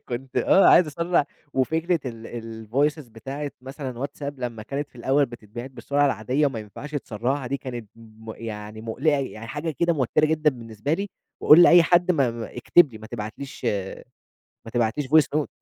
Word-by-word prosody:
كنت 125 +1 -6
آه، 195 - +5
عايز 175 - +7
أسرَّع 170 +1 +1 0.3
وفكرة 160 +6 +1
ال 115 -1 -7
الVoices 145 +3 0
بتاعِة 135 +6 -6
مثلًا 130 -1 -6
WhatsApp 145 0 -6
لمّا 120 -3 -5
كانت 140 +5 -4
في - - -21
الأول 135 +4 +2
بتتبعت 120 +1 -9
بالسرعة 145 +2 0
العادية 130 +5 +1
وما 135 -5 -3
ينفعش 110 +8 -9
تسرَّعها، 130 +1 -2
دي 140 +3 -1
كانت 120 -5 -7
م 110 0 -11
يعني 105 -1 -7
مُقلِقة، 135 +7 0
يعني 115 -5 -5
حاجة 150 +6 -3
كده 170 0 +3
موتِرة 150 +1 +2
جدًا 155 -1 +2
بالنسبة 115 +1 -5
لي، 200 +4 -1 0.3
وأقول 160 +3 +9
لأي 175 0 +8
حد 175 +2 +3
م - - -3
م 120 -5 0
اكتب 135 +4 +3
لي، 110 - -9
ما 110 - -10
تبعتليش 120 +5 -7 1.0
ما 115 - -9
تبعتليش 120 +4 0
Voice 155 +2 +5
note. 145 - -3
130 Hz, 175 wpm, -24 LUFS, 115-150 Hz, 1.0 s, وأقول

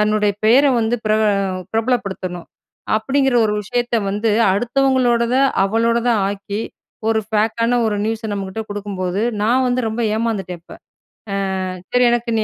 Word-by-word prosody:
தன்னுடைய 210 -1 +2
பேர 245 +6 +6 0.2
வந்து 225 +2 0
பிரபல 215 0 +3 0.4
பிரபலப்படுத்தணும். 200 -7 -2 0.5
அப்டீங்குற 270 +3 +1
ஒரு 210 - -1
விஷயத்த 240 +3 -1
வந்து 210 +2 0 0.2
அடுத்தவங்களோடத 245 +1 +1 0.3
அவளோடதா 230 +3 +1
ஆக்கி, 200 +1 -4 0.5
ஒரு 220 -1 +2
ஃபேக்கான 225 +3 +1
ஒரு 210 -1 0
நியூஸ 220 0 -3
நம்மகிட்ட 195 +1 -4
கொடுக்கும்போது, 200 -1 -3 0.2
நான் 250 +4 +2
வந்து 250 +1 +1
ரொம்ப 220 +2 -4 0.2
ஏமாந்துட்டேன் 195 -7 -3
இப்ப. - - -13 0.9
அ - - -2 0.3
சரி 250 0 +4
எனக்கு 240 0 -1
நீ - - +1
220 Hz, 130 wpm, -19 LUFS, 205-240 Hz, 0.9 s, பேர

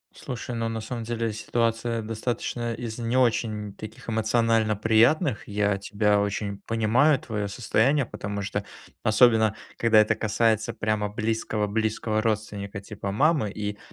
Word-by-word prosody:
Слушай, 125 0 -6
ну, 115 0 -1
на 115 0 -3
самом 115 +1 -5
деле, 115 -1 -2
ситуация, 115 +1 -1
достаточно, 115 +1 -3
из 115 -1 -6
не 120 +2 0
очень 110 -4 +1
таких, 110 +3 -10
эмоционально 110 -1 +2
приятных, 115 +4 +3
я 105 -1 +1
тебя 105 0 +1
очень 100 0 -2
понимаю, 120 +6 +3
твое 110 -8 -3
состояние, 125 +5 +1
потому 100 -2 -5
что, 100 0 -3 0.4
особенно, 110 -1 +4 0.2
когда 115 -2 +5
это 105 - +4
касается 110 0 +1
прямо 105 -1 -1
близкого 110 -1 -1
близкого 110 +1 -1
родственника, 105 -2 -2
типа 100 -1 -6
мамы, 140 -1 +2
и, 105 0 -4
110 Hz, 140 wpm, -26 LUFS, 105-115 Hz, 0.4 s, когда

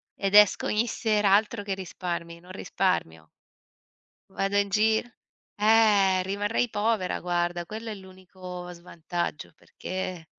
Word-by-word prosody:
ed 195 0 -1
esco 210 -2 +6
ogni 220 +3 +1
sera, 210 -3 +1
altro 210 +1 +2
che 200 -1 -3
risparmi, 170 -2 -5
non 180 +2 -14
risparmio. 80 - -2 1.0
Vado 195 +1 -2
in 200 0 +2
gir 220 +2 +2 0.5
eh, 210 -3 +4
rimarrei 205 +5 -1
povera 210 -3 -1
guarda, 175 0 -1
quello 220 +5 -7
è 215 - -4
l'unico 185 -2 -10
svantaggio 170 -1 -5
perché 185 +1 -6
190 Hz, 120 wpm, -26 LUFS, 180-210 Hz, 1.0 s, esco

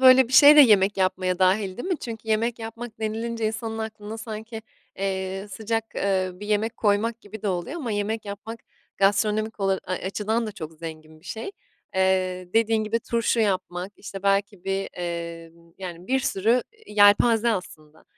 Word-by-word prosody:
böyle 260 -1 +7
bir 260 - -9
şey 290 +2 +9
de - - +11
yemek 205 -6 +5
yapmaya 185 -1 0
dâhil, 190 0 +2
değil 360 - -5
mi? 365 -5 0
Çünkü 225 -2 -7
yemek 225 +2 +1
yapmak 225 0 -8
denilince 225 +1 -2
insanın 225 0 -3
aklına 220 0 -6
sanki, 220 0 -7 0.4
eee, 190 0 -2
sıcak, 225 +1 -2
eee, 190 -1 0
bir 205 +3 -9
yemek 215 +2 0
koymak 220 +2 +1
gibi 210 +1 -10
de 210 - 0
oluyor 185 - -3
ama 250 -10 -3
yemek 210 +2 -2
yapmak 215 +3 -7 0.4
gastronomik 210 +2 +1
ola 195 -1 +1
ay, 185 - -2
açıdan 220 +4 -1
da 215 - -5
çok 165 -6 -7
zengin 155 -1 -10
bir 170 - -26
şey. 220 - -5 0.4
Eee, 185 -1 +1
dediğin 225 -1 +3
gibi 225 +2 -1
turşu 230 0 0
yapmak, 185 -2 -1
işte, 195 -2 -8
belki 200 -1 0
bir, 195 0 -1
emm, 170 -1 -6
yani, 180 -2 -7
bir 265 +1 +2
sürü 240 -2 +2 0.2
yelpaze 215 +3 +5
aslında. 160 -6 -7
205 Hz, 170 wpm, -25 LUFS, 185-225 Hz, 0.4 s, de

